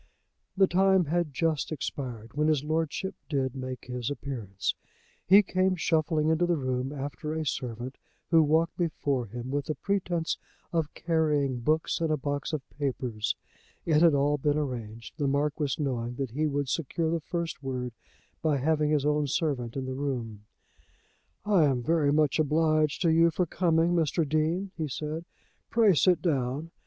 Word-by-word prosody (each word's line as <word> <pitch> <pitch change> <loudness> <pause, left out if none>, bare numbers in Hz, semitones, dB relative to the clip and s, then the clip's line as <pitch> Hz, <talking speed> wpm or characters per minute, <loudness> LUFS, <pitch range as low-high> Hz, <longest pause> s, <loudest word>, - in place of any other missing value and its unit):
The 195 - +7
time 190 0 +3
had 165 0 0
just 160 0 0
expired 125 -6 -5
when 150 +1 +1
his 150 -3 +2
lordship 160 +4 -1 0.2
did 135 -4 -1
make 130 -1 -6
his 125 -1 -3
appearance. 120 -9 -3 0.5
He 200 +3 +8
came 185 0 +1
shuffling 160 -2 +1
into 160 +2 +2
the 175 -1 +2
room 130 -1 -2
after 145 +2 -4
a 160 -1 -2
servant, 125 -1 -4 0.3
who 165 -1 +7
walked 160 +2 +2
before 145 -7 -1
him 120 +4 -6
with 145 0 -1
the 155 - -2
pretence 180 -5 -1 0.3
of 160 -2 0
carrying 150 -6 +1
books 155 +7 0
and 165 - +1
a 155 - +2
box 145 +2 -3
of 150 -4 -4
papers. 125 -6 -2 0.5
It 155 -2 +3
had 165 -4 +6
all 145 +1 +2
been 145 +2 +1
arranged, 115 -6 -5
the 145 - +1
Marquis 145 +1 0
knowing 125 -5 -2
that 135 -2 -3
he 155 +5 0
would 145 -1 -1
secure 160 +3 -1
the 165 -1 0
first 170 -1 -4
word 125 -3 -4 0.5
by 155 -3 +2
having 150 +2 +1
his 150 -2 +2
own 150 0 +2
servant 130 -5 -1
in 135 - -2
the 130 - -3
room. 120 -7 -4 1.0
"I 195 -7 +4
am 130 -4 +1
very 155 -1 +2
much 150 0 +2
obliged 155 +1 +2
to 165 - +4
you 165 +1 +5
for 180 +2 0
coming, 170 0 +2
Mr. 165 -1 +1
Dean," 160 +6 0
he 160 -2 -2
said. 155 +4 -4 0.4
"Pray 225 -4 +5
sit 180 +2 +3
down. 145 0 -1
150 Hz, 170 wpm, -28 LUFS, 135-165 Hz, 1.0 s, He